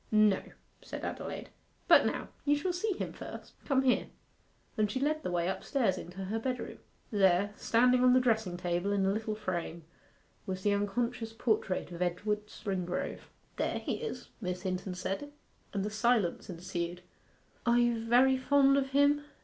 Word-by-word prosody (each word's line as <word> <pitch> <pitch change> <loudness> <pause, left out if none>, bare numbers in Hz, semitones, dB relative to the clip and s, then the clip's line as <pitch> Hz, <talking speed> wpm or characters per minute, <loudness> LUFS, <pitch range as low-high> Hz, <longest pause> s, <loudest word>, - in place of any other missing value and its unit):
'No,' 215 -2 +5 0.4
said - - -6
Adelaide. - - -5 0.4
'But - - +7
now, - - -3
you 290 0 +3
shall 350 +5 -1
see 400 +4 0
him - - -4
first; - - -9
come 270 -2 +2
here;' 255 -1 +2 0.7
and 215 -2 +1
she 235 - -2
led 305 +3 0
the - - -3
way 175 -1 0
upstairs 195 +1 0
into 185 +3 -7
her 220 +4 -2
bedroom. 250 +2 -4 0.3
There, 200 -1 +3
standing 250 +2 +3
on 250 0 +6
the 255 - +6
dressing 220 -7 +1
table 175 +2 -1
in 195 -1 +2
a 195 - +3
little 215 +1 -2
frame, 175 -5 -4 0.6
was 190 0 -4
the 205 - +3
unconscious 225 +3 -1
portrait 215 -6 0
of 170 0 -7
Edward 210 +4 -1
Springrove. 185 -4 -4 0.3
'There - - 0
he - - -2
is,' 460 -1 -6
Miss 180 -1 -3
Hinton 185 0 -3
said, 195 +10 -4 0.4
and 200 -1 -1
a 210 - -3
silence 215 -3 +1
ensued. 175 0 -4 0.6
'Are 235 0 +5
you 240 -2 +2
very 255 +3 +5
fond 275 +1 +4
of 270 -1 0
him? 285 +1 +4
215 Hz, 165 wpm, -31 LUFS, 185-250 Hz, 0.7 s, But